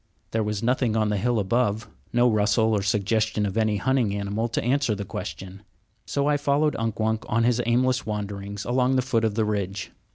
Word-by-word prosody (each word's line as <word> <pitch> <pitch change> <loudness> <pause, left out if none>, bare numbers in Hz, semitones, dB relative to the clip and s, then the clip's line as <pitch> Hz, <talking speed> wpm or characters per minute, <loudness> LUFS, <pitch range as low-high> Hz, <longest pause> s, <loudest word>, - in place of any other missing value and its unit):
There 110 - 0
was 105 0 -2
nothing 120 -2 +1
on 110 -1 +2
the 105 - 0
hill 120 +4 +1
above, 110 +1 0 0.2
no 120 +1 +4
rustle 110 0 +2
or 100 - +1
suggestion 105 +2 0
of 95 - -3
any 110 -2 +1
hunting 120 -2 +1
animal 100 +3 -2
to 115 - -2
answer 125 -3 +1
the 100 0 -5
question; 95 +1 -7 0.5
so 140 - 0
I 145 0 +3
followed 145 +1 +1
Unk 115 -1 -2
Wunk 110 0 0
on 115 +1 +2
his 120 0 +2
aimless 125 +2 +2
wanderings 100 -1 -5
along 125 +1 +2
the 130 - +2
foot 120 -3 0
of 110 -2 0
the 110 -1 +1
ridge. 100 -2 -3
110 Hz, 200 wpm, -25 LUFS, 105-125 Hz, 0.5 s, no